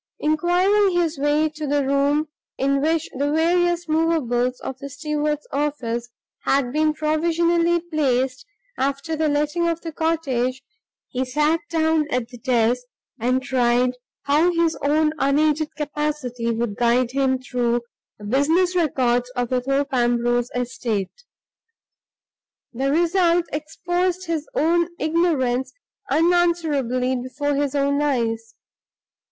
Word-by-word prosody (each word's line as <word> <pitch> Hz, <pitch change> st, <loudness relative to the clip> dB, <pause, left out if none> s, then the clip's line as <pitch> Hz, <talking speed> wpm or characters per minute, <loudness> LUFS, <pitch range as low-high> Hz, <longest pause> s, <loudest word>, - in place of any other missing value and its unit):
Inquiring 355 Hz, +5 st, +2 dB
his 330 Hz, -4 st, -1 dB
way 295 Hz, +2 st, +2 dB
to 305 Hz, 0 st, -6 dB
the 285 Hz, 0 st, +1 dB
room 280 Hz, +3 st, +1 dB, 0.3 s
in 275 Hz, +1 st, +1 dB
which 320 Hz, +1 st, +1 dB
the 285 Hz, +1 st, +1 dB
various 345 Hz, +2 st, +2 dB
movables 280 Hz, -7 st, +1 dB
of 265 Hz, -, -6 dB
the 280 Hz, -, -7 dB
steward's 300 Hz, +1 st, -2 dB
office 250 Hz, -5 st, -2 dB, 0.3 s
had 270 Hz, -2 st, +1 dB
been 310 Hz, 0 st, +2 dB
provisionally 335 Hz, +2 st, +1 dB
placed 270 Hz, -5 st, 0 dB, 0.4 s
after 280 Hz, +4 st, -1 dB
the 310 Hz, 0 st, 0 dB
letting 300 Hz, +4 st, 0 dB
of 335 Hz, 0 st, -1 dB
the 330 Hz, -, -6 dB
cottage, 270 Hz, -6 st, -1 dB, 0.5 s
he 255 Hz, +1 st, -2 dB
sat 300 Hz, +5 st, +1 dB
down 320 Hz, -2 st, +1 dB
at 250 Hz, -4 st, -2 dB
the 245 Hz, -2 st, -12 dB
desk, 245 Hz, 0 st, +1 dB, 0.4 s
and 255 Hz, +3 st, +1 dB
tried 250 Hz, -2 st, +2 dB, 0.3 s
how 305 Hz, +5 st, +3 dB
his 335 Hz, -1 st, +1 dB
own 305 Hz, +2 st, +2 dB
unaided 300 Hz, +3 st, +1 dB
capacity 295 Hz, -5 st, -3 dB
would 230 Hz, -2 st, -2 dB
guide 240 Hz, +1 st, +2 dB
him 265 Hz, -1 st, +1 dB
through 245 Hz, -2 st, -1 dB, 0.4 s
the 210 Hz, -, -11 dB
business 320 Hz, -, +2 dB
records 250 Hz, -7 st, +1 dB
of 245 Hz, -2 st, -1 dB
the 255 Hz, -1 st, +1 dB
Thorpe 275 Hz, +2 st, -1 dB
Ambrose 240 Hz, 0 st, +1 dB
estate. 245 Hz, -, -3 dB, 1.5 s
The 265 Hz, +3 st, -1 dB
result 345 Hz, +1 st, +2 dB
exposed 350 Hz, +4 st, -2 dB
his 320 Hz, -3 st, -3 dB
own 335 Hz, +3 st, +2 dB
ignorance 305 Hz, -7 st, +1 dB, 0.4 s
unanswerably 315 Hz, -7 st, +1 dB
before 285 Hz, +4 st, -2 dB
his 285 Hz, 0 st, -1 dB
own 280 Hz, 0 st, +1 dB
eyes. 230 Hz, -5 st, -1 dB
290 Hz, 125 wpm, -22 LUFS, 255-325 Hz, 1.5 s, how